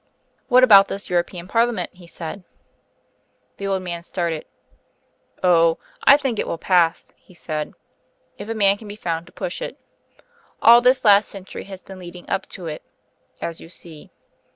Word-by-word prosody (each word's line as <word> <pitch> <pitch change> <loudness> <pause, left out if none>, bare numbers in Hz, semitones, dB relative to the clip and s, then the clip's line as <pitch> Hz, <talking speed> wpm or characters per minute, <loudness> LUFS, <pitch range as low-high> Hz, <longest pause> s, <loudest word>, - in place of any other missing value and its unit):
"What 255 +1 +5
about 200 -5 +8
this 200 -1 -7
European 175 0 -1
parliament?" 230 -3 0
he 180 -1 -16
said. 170 +3 -8 1.1
The 200 - -4
old 190 -1 -1
man 170 -2 -5
started. 170 -3 -3 1.0
"Oh!... 165 -2 +4 0.3
I 280 - +8
think 265 -6 -2
it - - -1
will - - -3
pass," 170 -1 +1
he 185 - -21
said, 155 -3 -5 0.6
"if 215 - -7
a 225 - -2
man 200 -2 +3
can 215 - -12
be 205 - -8
found 170 -4 -4
to - - -16
push - - -5
it. - - -6 0.8
All 235 +1 +7
this 255 0 +3
last 205 0 +6
century 195 -1 -8
has 190 -1 -10
been 190 -1 -11
leading 175 0 -11
up 195 0 -3
to 185 - -9
it, 155 -2 -5 0.6
as 165 -1 -5
you 165 - -12
see. 165 -3 -13
185 Hz, 170 wpm, -21 LUFS, 170-205 Hz, 1.1 s, about